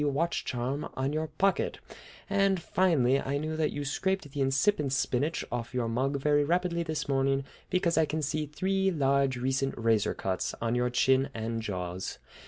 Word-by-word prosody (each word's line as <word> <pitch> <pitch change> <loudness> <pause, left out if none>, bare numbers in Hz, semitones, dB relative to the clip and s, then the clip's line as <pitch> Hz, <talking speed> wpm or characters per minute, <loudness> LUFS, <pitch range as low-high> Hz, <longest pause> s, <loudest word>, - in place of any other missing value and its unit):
watch 150 +4 0
charm 130 +3 -3
on 135 +2 -1
your 155 +1 -1
pocket; 190 +6 0 0.5
and, 195 -2 +2
finally, 155 -8 +2
I 140 +1 -1
knew 155 +2 -3
that 155 -1 +1
you 145 0 -4
scraped 190 +2 -1
the 140 0 -3
incipient 135 +2 +2
spinach 135 +4 0
off 120 +1 -4
your 120 -2 0
mug 130 +5 0
very 145 +1 +3
rapidly 170 +2 +1
this 160 -2 -3
morning 135 0 +1 0.3
because 180 -3 +2
I 160 - +4
can 155 +1 -2
see 150 +1 -1
three 190 +5 0
large 140 -5 +2
recent 135 +2 -1
razor 115 -2 +2
cuts 95 -1 -2
on 115 0 -1
your 125 0 +1
chin 130 +2 +3
and 115 0 -3
jaws! 90 -3 -4
140 Hz, 175 wpm, -29 LUFS, 125-160 Hz, 0.5 s, I